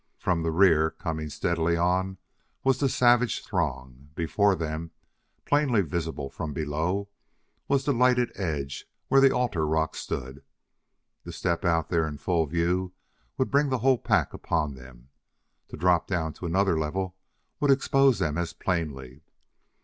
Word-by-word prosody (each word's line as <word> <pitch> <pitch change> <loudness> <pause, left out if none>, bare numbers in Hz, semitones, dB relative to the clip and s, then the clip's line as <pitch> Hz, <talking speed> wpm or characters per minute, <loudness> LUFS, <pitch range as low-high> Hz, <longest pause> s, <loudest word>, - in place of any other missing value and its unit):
From 90 -3 0
the 80 - -1
rear, 80 -2 +4
coming 80 -3 -5
steadily 85 +2 0
on, 90 +2 0 0.5
was 130 -1 +2
the 140 - +2
savage 120 -1 +3
throng; 70 - -3
before 100 +4 +2
them, 80 0 -4 0.6
plainly 145 -7 +3
visible 80 -4 -3
from 75 +2 -6
below, 80 +7 -2 0.6
was 140 -1 +1
the 145 - +2
lighted 125 0 +3
edge 70 -7 -4 0.2
where 135 - +5
the 135 - +7
altar 120 -12 0
rock 80 +1 0
stood. 65 +2 -5 0.8
To - - -8
step 85 +1 -2
out 85 -3 +1
there 80 -2 +1
in 75 -1 -6
full 85 0 0
view 90 +3 -1 0.4
would 130 - 0
bring 140 0 +3
the 130 - +1
whole 130 -3 +4
pack - - +1
upon 75 -4 -1
them; 65 -1 -14 0.6
to - - -9
drop 90 +1 +2
down 80 -4 -2
to 90 - -6
another 95 -1 +2
level 90 +4 -3 0.4
would 145 - +1
expose 135 -1 +4
them 75 +1 -1
as 85 - -3
plainly. 75 -7 -3
85 Hz, 150 wpm, -27 LUFS, 80-100 Hz, 0.8 s, the